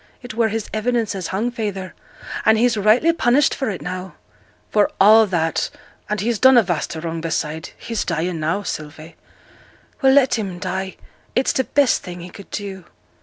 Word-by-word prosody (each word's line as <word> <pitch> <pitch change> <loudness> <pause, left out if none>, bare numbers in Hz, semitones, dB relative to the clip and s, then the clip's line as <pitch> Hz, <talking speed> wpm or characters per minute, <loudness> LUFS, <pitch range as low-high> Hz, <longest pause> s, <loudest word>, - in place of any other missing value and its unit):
It 245 - -7
were 230 0 +2
his 220 0 -3
evidence 230 0 0
as 190 -3 -4
hung 215 +6 -1
feyther; 200 -5 -4 0.5
and 220 0 +5
he's 240 +1 +3
rightly 220 +11 +4
punished 275 -2 +3
for 265 - -2
it 195 - -5
now.' 185 +1 -6 0.6
'For 210 -1 +3
a' 215 +2 +7
that, 165 -3 0 0.4
and 210 0 -1
he's 225 +1 -1
done 260 -1 +7
a 235 - +7
vast 175 -3 -2
o' - - -5
wrong 165 0 -4
beside, 160 0 -3
he's 230 -2 -3
dying 170 0 -2
now, 165 +7 -1
Sylvie!' 155 -1 -7 0.9
'Well! 265 -1 +5
let 265 -4 +4
him 190 -4 -4
die 190 +1 -4 0.4
it's 260 - +2
t' - - +2
best 280 0 +2
thing 175 -1 -8
he 175 +1 -9
could 200 - -12
do!' 195 -3 -6
205 Hz, 180 wpm, -21 LUFS, 175-235 Hz, 0.9 s, a